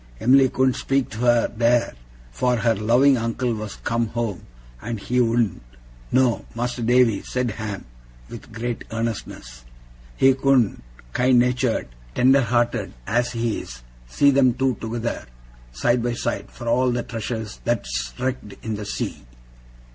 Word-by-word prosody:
Em'ly 135 +1 +5
couldn't 130 +1 +2
speak 135 +1 -1
to 110 - -7
her 120 -1 +3
theer, 120 0 +3 0.4
for 125 -1 +1
her 115 -1 +2
loving 120 +6 +4
uncle 115 +1 -1
was 110 -2 -5
come 115 -1 0
home, 110 -4 -3 0.4
and 115 -1 -4
he 125 +5 -1
wouldn't 115 -4 +1 0.5
no, 130 -3 +2
Mas'r 120 0 -2
Davy,' 120 -2 +3
said 125 -2 -2
Ham, 105 -2 -6 0.4
with 115 0 -11
great 115 +1 -4
earnestness, 110 - -5 0.5
'he 135 0 +5
couldn't, 135 -4 +2 0.3
kind 125 0 +3
natur'd, 125 -1 +1 0.3
tender 135 +2 +5
hearted 120 -3 0
as 120 +2 0
he 115 -2 -1
is, - - -10 0.2
see 140 - +4
them 130 -3 +4
two 130 0 +1
together, 115 - -3 0.4
side 120 - +1
by 120 0 -1
side, 120 0 -3
for 120 - -9
all 125 +2 +3
the 120 0 -1
treasures 110 -1 -5
that's 100 - -2
wrecked 130 -5 -3
in 110 - -3
the 105 - -6
sea. - - -4
120 Hz, 145 wpm, -23 LUFS, 115-125 Hz, 0.5 s, Em'ly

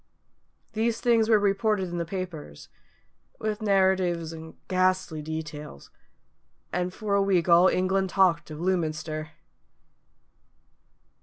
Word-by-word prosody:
These 225 +1 0
things 230 -3 +2
were 220 - +6
reported 205 -1 +1
in 175 0 -4
the 170 - -2
papers, 170 - -7 0.7
with 215 0 -3
narratives 190 -5 +1
and 160 0 -10
ghastly 185 -3 0
details, 155 - -7 0.8
and 180 +1 -1
for 205 +2 -4
a 200 - +4
week 190 -3 +2
all 175 +1 +6
England 190 +1 +1
talked 185 -5 +2
of 155 0 -8
Lewminster. 155 -3 -2
185 Hz, 110 wpm, -26 LUFS, 160-195 Hz, 0.8 s, were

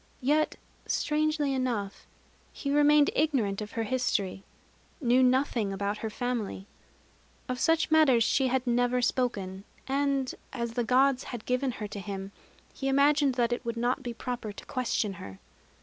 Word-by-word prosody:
Yet, 300 +4 +2 0.3
strangely 305 -2 0
enough, 235 -7 -2 0.4
he 280 - -4
remained 295 0 +5
ignorant 245 -10 +1
of 210 - -7
her 225 - -1
history, 210 -5 -1 0.6
knew 250 -3 +3
nothing 255 -5 +2
about 200 +2 -2
her 220 - -3
family. 225 -4 -3 0.8
Of 255 -1 -3
such 325 +1 +2
matters 285 -7 +5
she 265 +4 +2
had 255 0 0
never 245 +1 +1
spoken; 200 -7 -1 0.2
and, 275 -1 0 0.2
as 235 -3 -3
the 240 0 0
Gods 260 +2 +3
had 240 -4 -7
given 255 +1 0
her 210 - -5
to 205 - -6
him, 195 0 -6 0.4
he 270 - -4
imagined 280 0 +3
that 240 -1 +1
it 240 - -4
would 235 -1 -4
not 245 +3 0
be 245 -2 -4
proper 240 -2 -5
to 205 - -11
question 235 -5 -1
her. 95 -1 -9
250 Hz, 155 wpm, -29 LUFS, 220-275 Hz, 0.8 s, remained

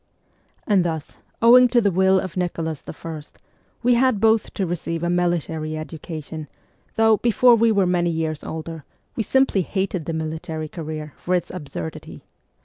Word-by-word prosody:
And 200 -4 +3
thus, 160 -3 -4 0.3
owing 250 +2 +8
to 245 0 +3
the 205 -4 +2
will 190 +1 +4
of 185 -2 -5
Nicholas 165 -4 -3
I., 160 -2 -7 0.6
we 245 +1 +4
had 245 -3 +3
both 220 +1 +3
to 195 - 0
receive 165 -1 -3
a 175 - +1
military 160 -3 -1
education, 155 0 -7 0.5
though, 225 -1 +4
before 240 +2 +4
we 230 0 +4
were 200 -3 +3
many 175 -1 +1
years 160 -2 -2
older, 160 -1 -6 0.3
we - - -1
simply 265 -3 +2
hated 190 -2 -2
the 165 - -3
military 160 0 -4
career 155 -3 -6
for 180 - -1
its 180 - -2
absurdity. 140 - -7
175 Hz, 155 wpm, -22 LUFS, 160-205 Hz, 0.6 s, owing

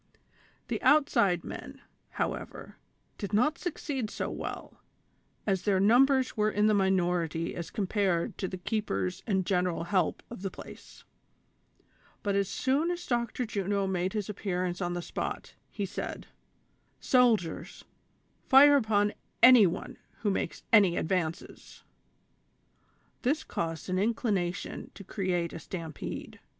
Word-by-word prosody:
The - - -3
outside 205 - +3
men, - - -8 0.3
however, - - -5 0.4
did 200 -1 -5
not 250 +9 +2
succeed 280 - -3
so - - -4
well, - - -7 0.6
as 195 -3 +1
their 200 -3 +2
numbei'S 255 +5 +4
were 215 0 +2
in 210 0 +1
the 215 - +4
minority 175 -4 +1
as 170 -1 -5
compared 195 -4 0
with 190 - -1
the 185 - -5
keepers 100 - -2
and 190 -4 +1
general 180 -3 0
help 180 0 0
of 235 - -8
the 195 - -2
place; - - -12 1.2
but 200 -1 0
as 200 -1 +1
soon 280 +6 +1
as 350 0 -3
Dr. 240 0 -1
Juno 200 -2 -1
made 185 -1 -1
his 210 -3 -2
appearance 185 -3 -3
on 175 -1 -1
the 175 0 -4
spot, - - -5 0.2
he 205 - -3
said: 185 - -5 0.4
" - - -42
Soldiers, 230 -10 +2 0.6
fire 285 +2 +8
upon 210 -4 +2 0.3
any 240 -5 +9
one 175 +2 -5 0.2
who 210 - +1
makes - - -3
any 195 -6 +6
advances! 165 -1 -3 0.7
" - - -40
This 290 +5 0
caused 165 -2 -4
an 185 0 0
inclination 200 -4 -1
to 200 - -10
create 180 -3 -2
a - - -6
stampede. 160 -1 -7
200 Hz, 135 wpm, -29 LUFS, 180-225 Hz, 1.2 s, any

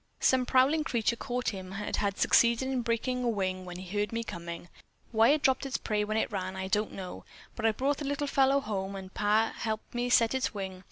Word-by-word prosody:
Some 255 -1 +3
prowling 275 +5 +4
creature 235 -5 0
caught 250 +1 -2
him 190 -2 -7
and 205 +1 -3
had 200 -1 -1
succeeded 235 +2 +4
in 260 -2 0
breaking 245 +2 -1
a 240 - +1
wing 185 -4 -2
when 180 0 -7
it 185 -1 -9
heard 205 0 -1
me 230 0 -2
coming. 170 -4 -7 0.4
Why 225 +1 +5
it 295 0 +3
dropped 265 +1 +3
its 275 -1 -2
prey 210 -1 -1
when 215 +1 -1
it 220 - 0
ran, 190 -2 -3
I 190 0 -4
don't 210 +2 0
know, 185 -2 -7 0.3
but 225 - +1
I - - +4
brought 270 +6 0
the 295 - -5
little 285 +1 -1
fellow 275 0 +3
home 200 -4 -3
and 190 -1 -8
Pap 215 +2 +2
helped 220 -1 -4
me 245 0 -1
set 230 -1 +4
its 260 -3 -1
wing. 190 -2 -5
220 Hz, 230 wpm, -30 LUFS, 195-255 Hz, 0.4 s, Why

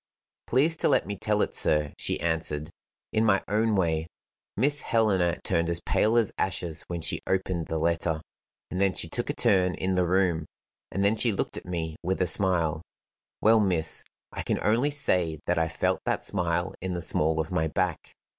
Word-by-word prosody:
"Please 150 +7 +3
to - - +2
let - - +3
me 100 +2 -4
tell 105 +2 +1
it, - - -3
sir," 75 -1 +1
she - - -1
answered, 80 -2 -2 0.4
"in 110 - +2
my 100 -3 +3
own 110 +1 +1
way. 80 -4 0 0.5
Miss 145 +6 +2
Helena 95 -7 +1
turned 85 -2 0
as 85 0 -1
pale 110 +2 +2
as 115 -4 +2
ashes 85 -4 -2
when 85 -1 -4
she 80 - 0
opened 95 -3 -1
the 80 - -2
letter, 80 0 0 0.5
and 90 - -2
then 95 -2 +2
she - - -1
took - - -3
a - - 0
turn 90 -2 +3
in 95 0 -1
the 90 -1 +1
room, 90 -4 +1 0.4
and 100 +1 0
then 105 +2 +3
she 115 +1 +2
looked 100 - -3
at - - -8
me 80 -3 -4
with 95 +2 -1
a 90 - +2
smile 85 -3 +1 0.6
well, 110 +1 +5
miss, 90 -6 +2 0.3
I - - -5
can - - -1
only 115 +7 +2
say 90 - +2
that 90 -1 +1
I 80 - +1
felt 80 - 0
that - - 0
smile 85 -1 -1
in 95 -1 -3
the 85 - -3
small 80 +1 +1
of 80 +1 -2
my 80 -3 +1
back. 90 +1 -2
90 Hz, 195 wpm, -27 LUFS, 80-100 Hz, 0.6 s, well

